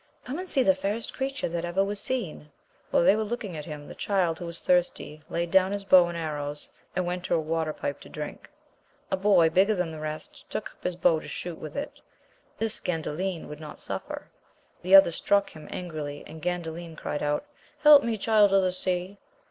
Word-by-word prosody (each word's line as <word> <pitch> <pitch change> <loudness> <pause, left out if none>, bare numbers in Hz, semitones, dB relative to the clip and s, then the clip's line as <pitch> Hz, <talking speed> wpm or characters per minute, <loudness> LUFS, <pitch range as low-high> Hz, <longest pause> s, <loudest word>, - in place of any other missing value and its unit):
Come 275 +7 -4
and 370 0 -5
see 265 - +3
the 285 - +5
fairest 230 -5 -3
creature 270 0 -2
that 170 0 -3
ever 175 +3 +1
was 200 +1 -3
seen! 205 -11 -3 0.4
While - - +3
they 190 +4 +6
were 220 - 0
looking 215 -4 -4
at 150 -1 -6
him, 150 -2 -8
the - - -8
child, 180 -5 0
who 175 - -5
was 170 0 -6
thirsty, 175 -4 0
laid 170 0 -2
down 190 +1 +4
'^his 200 -1 -5
bow 180 -2 +7
and 170 0 -4
arrows, 150 -2 -4 0.3
and 185 0 0
went 180 0 -3
to - - +1
a - - +2
water 160 0 -1
pipe 145 -1 -4
to - - -13
drink. 150 -1 -7 0.6
A - - +3
boy 190 -4 +4
big 190 +4 +4
ger 215 - +2
than 180 -3 -1
the 160 - -7
rest 155 0 -7
took - - -4
up - - -26
his 180 - -1
bow 165 -2 +3
to - - -10
shoot 175 -2 -5
with 155 - -8
it; 285 - -5 0.6
this 225 -1 +1
Gandalin 170 +1 -3
would 150 - -8
not 155 -1 -9
suffer; - - -6 0.5
the 185 +2 +6
other 195 -3 +9
struck 200 +4 +1
him 155 -1 -11
angrily, 155 -5 -5
and 160 - -10
Gandalin 170 -1 -4
cried 145 - -3
out. 150 - 0 0.4
Help 300 -2 +10
me. 230 -1 -1
Child 210 -1 +4
of 195 -1 +5
the 185 - +2
Sea 185 +1 -2
180 Hz, 215 wpm, -27 LUFS, 160-200 Hz, 0.6 s, Help